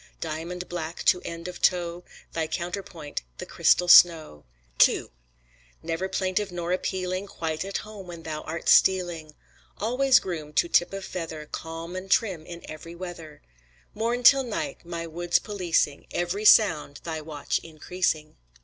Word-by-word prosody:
Diamond 170 +3 -5
black 170 -1 -5
to 180 - +4
end 170 +1 -6
of 180 - -8
toe, 175 -1 +1 0.3
Thy 160 -1 -1
counterpoint 170 -3 -5 0.2
the - - -6
crystal 180 - +3
snow. 165 - +6 0.4
II - - -4 0.7
Never 165 +3 -2
plaintive 190 +1 -1
nor 175 0 -4
appealing, 185 +1 -2
Quite 160 -3 -3
at 195 +1 -3
home 210 -3 -10
when 170 -2 -9
thou 155 -1 -5
art 165 +1 -6
stealing, 175 -5 +3 0.4
Always 255 +5 +3
groomed 155 -5 -6
to - - +3
tip 175 - +3
of 195 0 -6
feather, 160 -3 -6
Calm 165 +3 -7
and 185 +1 -6
trim 190 -8 +1
in 170 0 -8
every 160 +2 -9
weather, 170 -4 -9 0.5
Morn 235 +3 -1
till 275 +2 +8
night 240 -5 -4
my 170 -1 -5
woods 170 +1 0
policing, 175 -8 -1
Every 180 +5 -2
sound 165 -10 +5
thy 160 -2 -4
watch 150 -2 -3
increasing. 160 -1 -3
175 Hz, 150 wpm, -26 LUFS, 160-185 Hz, 0.7 s, till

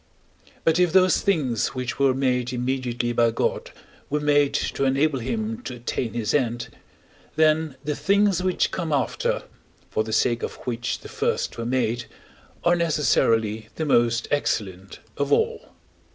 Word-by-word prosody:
But 165 +1 +3
if 180 -2 +3
those 185 0 +4
things 135 - 0
which 125 0 -4
were 135 -2 +3
made 125 -2 0
immediately 125 -1 -2
by 115 0 +3
God 115 - -1 0.4
were 150 - 0
made 145 -1 +2
to - - -1
enable 135 +1 +2
him 220 - -3
to 125 - -5
attain 120 -1 -3
his 115 -2 -1
end, 120 -4 0 0.7
then 155 -2 +2
the 150 0 -2
things 200 0 +2
which 185 0 +1
come 170 -3 -3
after, 140 -3 0 0.5
for 110 - +1
the 110 - -6
sake 120 +1 +2
of - - -4
which 120 0 -3
the - - -10
first - - -1
were 115 - -3
made, 120 -2 0 0.6
are 175 0 +4
necessarily 115 -10 +1
the 160 - -2
most 120 -3 +2
excellent 100 -9 -2 0.2
of 140 0 -1
all. - - +1
130 Hz, 150 wpm, -24 LUFS, 120-155 Hz, 0.7 s, those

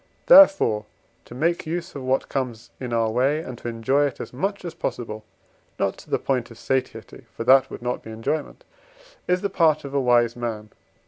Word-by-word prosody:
Therefore, 290 - +6 0.4
to 120 - -12
make 165 +5 0
use 170 +2 -4
of 140 - -7
what 130 +1 0
comes 120 -4 -4
in 125 -2 -5
our 115 -1 +1
way, 135 +6 +1
and 130 -6 -7
to - - -7
enjoy 130 +5 +1
it 135 - -8
as - - -7
much 195 +9 -3
as 170 - -5
possible 110 -3 -5 0.5
(not - - 0
to - - -15
the - - +1
point 130 -3 -2
of 115 - -13
satiety, 125 -2 -4
for - - -3
that 130 +2 +5
would - - -9
not 125 0 -2
be - - -11
enjoyment) 145 - -4 0.6
is 180 0 +1
the 200 - -1
part 160 -5 +3
of 140 - -7
a 140 - +1
wise 120 -2 +3
man. 110 -3 -5
130 Hz, 200 wpm, -23 LUFS, 115-150 Hz, 0.6 s, Therefore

